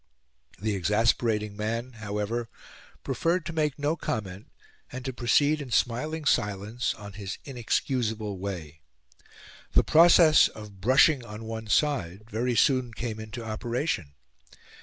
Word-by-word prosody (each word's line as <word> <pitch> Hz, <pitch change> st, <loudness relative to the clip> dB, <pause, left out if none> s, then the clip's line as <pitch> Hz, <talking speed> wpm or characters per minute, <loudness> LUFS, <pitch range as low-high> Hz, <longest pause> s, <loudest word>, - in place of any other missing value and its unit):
The 105 Hz, +2 st, -1 dB
exasperating 105 Hz, +2 st, +1 dB
man, 115 Hz, +4 st, -3 dB
however, 105 Hz, +3 st, -3 dB, 0.5 s
preferred 165 Hz, +7 st, 0 dB
to 170 Hz, -, -5 dB
make 150 Hz, -3 st, 0 dB
no 145 Hz, +2 st, 0 dB
comment, 100 Hz, -, -5 dB, 0.4 s
and 130 Hz, 0 st, -7 dB
to 130 Hz, -, -3 dB
proceed 145 Hz, +5 st, +2 dB
in 135 Hz, -, -7 dB
smiling 150 Hz, +7 st, 0 dB
silence 105 Hz, +1 st, 0 dB
on 105 Hz, -2 st, -10 dB
his 100 Hz, -1 st, -6 dB
inexcusable 115 Hz, -5 st, -2 dB
way. 85 Hz, -6 st, -6 dB, 0.9 s
The -, -, +5 dB
process 165 Hz, -1 st, +7 dB
of 105 Hz, -3 st, -12 dB
"brushing 130 Hz, +4 st, +5 dB
on 105 Hz, -1 st, -9 dB
one 110 Hz, 0 st, -6 dB
side" 105 Hz, -, 0 dB
very 120 Hz, +3 st, 0 dB
soon 125 Hz, -1 st, +2 dB
came 115 Hz, -2 st, -4 dB
into 110 Hz, +2 st, -7 dB
operation. 110 Hz, -, -3 dB
115 Hz, 125 wpm, -27 LUFS, 105-130 Hz, 0.9 s, process